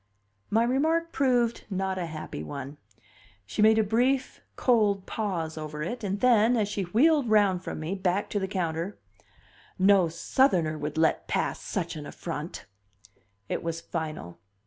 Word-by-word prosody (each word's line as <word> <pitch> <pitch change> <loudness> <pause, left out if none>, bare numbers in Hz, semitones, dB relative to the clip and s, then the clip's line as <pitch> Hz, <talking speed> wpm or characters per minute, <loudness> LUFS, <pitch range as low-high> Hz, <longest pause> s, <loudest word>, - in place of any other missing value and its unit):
My 225 +2 +3
remark 320 +7 +1
proved 245 -4 +1
not 190 -1 -2
a 175 - -2
happy 155 - -6
one. 140 - -7 0.7
She 105 - -3
made 220 +1 +6
a 220 - +4
brief, 250 +6 0
cold 210 -6 +2
pause 170 -7 -3
over 150 0 -5
it, 235 +7 -4
and 200 0 -2
then, 240 -1 +4
as 210 -2 +1
she 205 -1 -3
wheeled 270 - +3
round 200 -4 +3
from - - -5
me, 160 +4 -3
back 190 +1 0
to 205 - 0
the 190 - -2
counter: 175 0 -3 0.8
"No 190 -2 +5
Southerner 170 - +2
would 150 +1 -5
let 160 0 +2
pass - - -1
such 175 -6 -3
an 150 -2 -7
affront." 165 -1 -6 0.8
It - - -2
was 165 0 -3
final. 155 - -5
195 Hz, 155 wpm, -27 LUFS, 165-225 Hz, 0.8 s, made